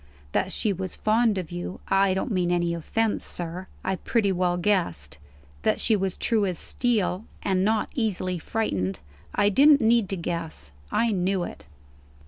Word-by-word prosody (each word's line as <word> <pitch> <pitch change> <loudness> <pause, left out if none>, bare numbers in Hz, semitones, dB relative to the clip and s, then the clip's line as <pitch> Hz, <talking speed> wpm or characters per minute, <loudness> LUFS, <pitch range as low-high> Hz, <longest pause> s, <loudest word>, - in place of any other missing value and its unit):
That 190 - 0
she 210 +1 0
was 185 0 -4
fond 220 -1 +2
of 180 -3 -4
you 175 +1 -5
I 195 -1 +3
don't 210 +6 -2
mean 180 -3 +1
any 175 -1 +1
offence, 215 +6 -1
sir 175 +2 -5 0.2
I 190 0 -1
pretty 210 -2 +1
well 180 -1 +1
guessed. 85 - 0 0.4
That - - +1
she 225 - +3
was 195 -2 -1
true 225 -3 +1
as 180 -3 -2
steel, 220 -4 0 0.2
and 190 -1 +1
not 215 +1 +1
easily 185 -6 -1
frightened, 95 - -2 0.4
I 205 0 +4
didn't 285 +7 +6
need 225 -4 +3
to 195 - -2
guess; 165 - -5 0.2
I 230 -1 +2
knew 190 -1 0
it." 75 - -8
190 Hz, 165 wpm, -26 LUFS, 175-215 Hz, 0.4 s, didn't